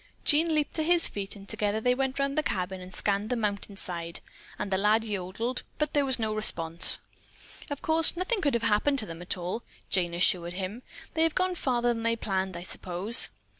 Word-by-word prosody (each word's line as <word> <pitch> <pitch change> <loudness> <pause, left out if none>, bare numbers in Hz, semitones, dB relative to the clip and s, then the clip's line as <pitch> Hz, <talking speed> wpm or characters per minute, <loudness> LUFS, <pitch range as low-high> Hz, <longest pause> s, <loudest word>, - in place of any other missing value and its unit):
Jean 315 +2 +3
leaped 300 -1 0
to 315 - -1
his 340 +2 +4
feet 200 0 -5
and 200 -1 -13
together 210 0 -1
they 250 +3 +2
went 265 +1 -2
around 275 0 0
the 310 - +1
cabin 190 -7 -3
and 180 0 -10
scanned 200 +3 0
the 250 - 0
mountain 205 -3 -3
side 170 -3 -2 0.4
and 200 - -4
the 190 - +2
lad 215 +2 +3
yodeled, 215 +4 -3 0.2
but 300 -1 -1
there 285 -1 +2
was 265 -2 +1
no 220 -2 -2
response. 170 -5 +4 0.7
"Of 285 -1 -6
course, 325 +1 +4
nothing 385 +4 -1
could 285 -4 +1
have 235 - -1
happened 230 +6 +2
to 220 - +4
them 165 -2 -9 0.2
all," 180 +6 -4 0.3
Jane 175 -2 0
assured 175 0 +2
him. 195 +5 -5 0.3
"They 320 - 0
have 325 -1 +2
gone 370 0 +1
farther 245 -7 +1
than 230 - -5
they 230 0 +1
planned, 190 -4 -2
I 175 - -7
suppose." 185 +5 +1
220 Hz, 210 wpm, -28 LUFS, 190-275 Hz, 0.7 s, his